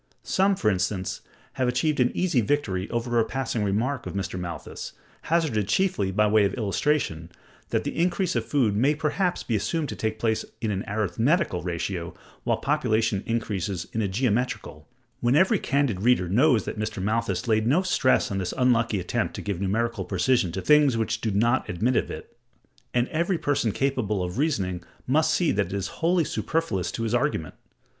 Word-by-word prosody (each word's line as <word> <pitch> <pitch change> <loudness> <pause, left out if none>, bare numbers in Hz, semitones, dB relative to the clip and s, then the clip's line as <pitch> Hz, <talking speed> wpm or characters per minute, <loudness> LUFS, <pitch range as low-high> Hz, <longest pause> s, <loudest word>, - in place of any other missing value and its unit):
Some, 195 +1 +2
for 110 - +2
instance, 90 -1 -2 0.3
have 130 - 0
achieved 135 +5 +1
an 125 -1 +4
easy 175 -9 +2
victory 100 -6 -1
over 120 0 0
a - - +4
passing 120 -2 -2
remark 115 +7 -1
of - - -6
Mr. 95 -2 -3
Malthus, 85 -2 -6 0.4
hazarded 150 - +1
chiefly 140 - +1
by 105 +3 +3
way 105 0 +4
of 100 - 0
illustration, 105 - -1 0.4
that - - 0
the - - -4
increase 180 +1 0
of - - +1
food 120 -8 +1
may 135 +8 +3
perhaps 170 +5 -1
be 115 - -1
assumed 140 +10 -1
to - - -4
take 110 0 -2
place 110 0 0 0.2
in 110 -2 -1
an 95 -1 -2
arithmetical 110 - +1
ratio, 85 0 -4 0.3
while - - +1
population 110 -8 +1
increases 100 -5 -2
in 115 - 0
a 105 - +1
geometrical: 120 +4 -2 0.3
when 120 +2 +2
every 190 +5 +4
candid 140 -9 0
reader 115 -5 +3
knows 115 - +3
that - - -5
Mr. 110 -2 -3
Malthus 115 +5 -1
laid 110 -1 +2
no 155 +9 +3
stress 155 - +2
on 95 - -1
this 90 -2 -3
unlucky 115 -5 +2
attempt 90 - -2
to - - -5
give 100 -3 -3
numerical 110 +2 0
precision 95 0 +1
to 95 +2 -4
things 150 -5 +5
which 110 0 -1
do 110 - 0
not 115 +5 +1
admit 115 +9 0
of - - +1
it, - - -9 0.6
and 120 0 +1
every 170 +3 0
person 135 -8 0
capable 110 -6 0
of 90 +7 -4
reasoning 95 - 0 0.2
must 155 +4 +2
see 170 0 +2
that 100 -2 0
it 95 - -7
is 100 0 -4
wholly 170 +1 +3
superfluous 155 - -1
to 115 - -4
his 115 0 -1
argument. 120 - 0
115 Hz, 185 wpm, -25 LUFS, 100-140 Hz, 0.6 s, things